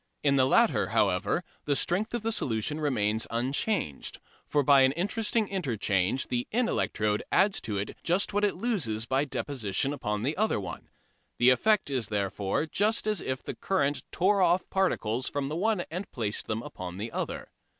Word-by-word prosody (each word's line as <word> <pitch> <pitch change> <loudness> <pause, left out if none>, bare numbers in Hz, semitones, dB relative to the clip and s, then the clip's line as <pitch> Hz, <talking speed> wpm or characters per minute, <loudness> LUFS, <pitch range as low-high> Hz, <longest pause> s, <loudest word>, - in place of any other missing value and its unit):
In 140 -1 +3
the 130 -1 +4
latter, - - +3
however, - - +1 0.2
the 145 - +1
strength 205 +11 0
of 235 - -3
the 225 - 0
solution 145 - 0
remains 110 -7 +1
unchanged, 130 - -1 0.3
for 145 - +2
by 140 0 +6
an 130 0 +4
interesting 210 +5 0
interchange 115 - 0
the 125 -1 -1
in 240 +1 +1
electrode 105 -1 0
adds 195 +1 +3
to 105 -2 -3
it 100 +2 -4
just 185 +4 +1
what 205 +1 +1
it 205 - +2
loses 145 - -1
by 135 +3 +1
deposition 135 -3 -2
upon 105 -6 -3
the 145 +5 0
other 215 - +1
one. 90 -3 -7 0.5
The 125 +1 +6
effect 210 - +2
is 130 -4 0
therefore 100 +4 -1
just 210 +8 +1
as 215 -2 0
if 130 -1 -3
the - - -5
current 145 -7 0
tore 195 +2 +2
off 175 0 +3
particles 130 - 0
from 140 -1 -2
the 155 - -3
one 205 +2 +1
and 180 +4 -5
placed 110 -3 -3
them 110 +1 -2
upon 90 -1 -7
the 110 +3 -4
other. - - -4
140 Hz, 180 wpm, -28 LUFS, -, 0.5 s, by